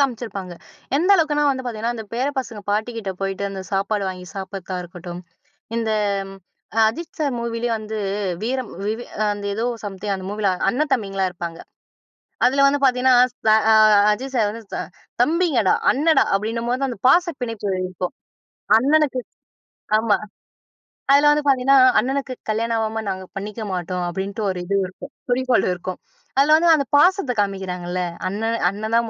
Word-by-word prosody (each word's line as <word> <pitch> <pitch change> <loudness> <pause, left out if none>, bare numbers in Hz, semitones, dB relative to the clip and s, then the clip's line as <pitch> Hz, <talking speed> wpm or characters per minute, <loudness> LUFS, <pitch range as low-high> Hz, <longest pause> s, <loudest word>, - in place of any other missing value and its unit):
காமிச்சிருப்பாங்க. 220 -9 -2 0.4
எந்த 350 +7 +2
அளவுக்குனா 300 -4 +2
வந்து 260 -1 -3
பாத்திங்கன்னா 230 0 -2
அந்த 220 - -6
பேர 250 +3 0
பசங்க 230 -5 -5
பாட்டிக்கிட்ட 215 -1 -2
போயிட்டு, 195 0 -2
அந்த 195 -1 -6
சாப்பாடு 200 +1 0
வாங்கி 185 -1 -7
சாப்டறதா 190 -1 -5
இருக்கட்டும். 175 0 -8 0.6
இந்த 225 -1 -1 1.0
அஜித் 320 +8 -6
சார் 290 -4 0
மூவிலேயே 235 0 -2
வந்து, 215 0 -6 0.5
வீரம் 255 +1 -2 0.2
வி 210 - +1
வி 240 - -7 0.2
அ - - +3
அந்த 205 0 -8
ஏதோ 225 +3 -2 0.2
சம்திங் 200 0 -3
அந்த 190 -1 -6
மூவில 205 -1 0 0.2
அண்ணன், 290 +9 0
தம்பிங்களா 195 -5 -2
இருப்பாங்க. 170 -2 -6 0.9
அதுல 275 +3 +4
வந்து 280 +1 +3
பாத்திங்கன்னா, 255 -1 +4 0.4
அ - - +7 0.2
அ - - +6 0.4
அஜித் 260 +6 -4
சார் 220 -4 +2
வந்து 230 +2 -8
ச - - -2 0.5
"தம்பிங்கடா 300 - +2 0.2
அண்ணன்டா" 310 +4 +3
அப்டின்னும்போதான் 235 +5 -2
அந்த 235 - -7
பாச 345 +7 +6 0.2
பிணைப்புகள் 205 -6 -2
இருக்கும். 180 -1 -5 0.6
அண்ணனுக்கு 280 +1 +2 0.8
ஆமா. 220 -2 +2 1.0
அதுல 290 +1 +6
வந்து 295 0 +2
பாத்திங்கன்னா, 270 0 +4 0.2
"அண்ணனுக்கு 270 0 -2 0.2
கல்யாணம் 230 +2 0
ஆகாம 220 0 -1
நாங்க 190 -1 -4
பண்ணிக்க 210 +3 -5
மாட்டோம்." 180 0 -3
அப்டின்ட்டு 195 +4 -4
ஒரு 185 -1 -3
இது 200 - -1
இருக்கும், 265 +9 -11 0.2
குறிக்கோள் 255 0 +2
இருக்கும். 180 +1 -6 0.4
அதுல 290 +3 +6
வந்து 340 +1 +3
அந்த 280 -2 0
பாசத்த 360 -2 +4
காமிக்கிறாங்கள்ல, 185 -3 -2 0.3
அண்ணன் 225 +4 -1
அண்ணன் 220 +4 -3
தான் 235 -1 0
225 Hz, 150 wpm, -21 LUFS, 195-260 Hz, 1.0 s, அ